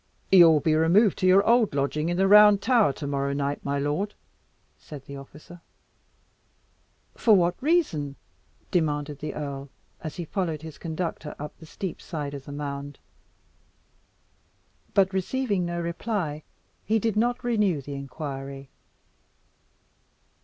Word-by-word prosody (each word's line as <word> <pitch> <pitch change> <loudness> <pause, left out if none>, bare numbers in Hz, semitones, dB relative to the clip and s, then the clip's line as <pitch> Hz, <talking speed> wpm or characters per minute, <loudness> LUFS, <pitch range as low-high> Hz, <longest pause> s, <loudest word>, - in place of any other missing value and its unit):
"You 175 -3 +9
will 155 -2 +4
be 155 +2 +1
removed 170 +6 +4
to 185 - +2
your 190 +2 +5
old 235 -8 +3
lodging, 150 +3 0
in 175 - -1
the 190 +1 +3
Round 210 0 +8
Tower, 230 - +3
to 145 - -7
morrow 140 0 -1
night, 140 0 -2
my 140 0 -1
lord," 150 +9 -2 0.6
said 145 -3 -11
the 140 - -9
officer. 150 +5 -12 1.5
"For 220 -3 +4
what 175 -2 +2
reason?" 255 - +1 0.6
demanded 150 -4 -1
the 150 0 -5
earl, 140 -2 -5 0.3
as 155 -2 -5
he 175 - -5
followed 165 -4 -3
his 160 -2 -9
conductor 165 -1 -4
up 150 +1 -7
the 160 - -13
steep 185 +1 -6
side 150 -4 -5
of 140 -1 -8
the - - -9
mound. 145 -1 -5 2.0
But 195 -1 +3
receiving 195 -1 -1
no 170 0 -3
reply, 170 -2 -3 0.4
he 220 - +1
did 220 -1 -1
not 245 +3 0
renew 210 -9 +1
the 140 +1 -8
inquiry. 140 -1 -7
160 Hz, 140 wpm, -26 LUFS, 145-195 Hz, 2.0 s, You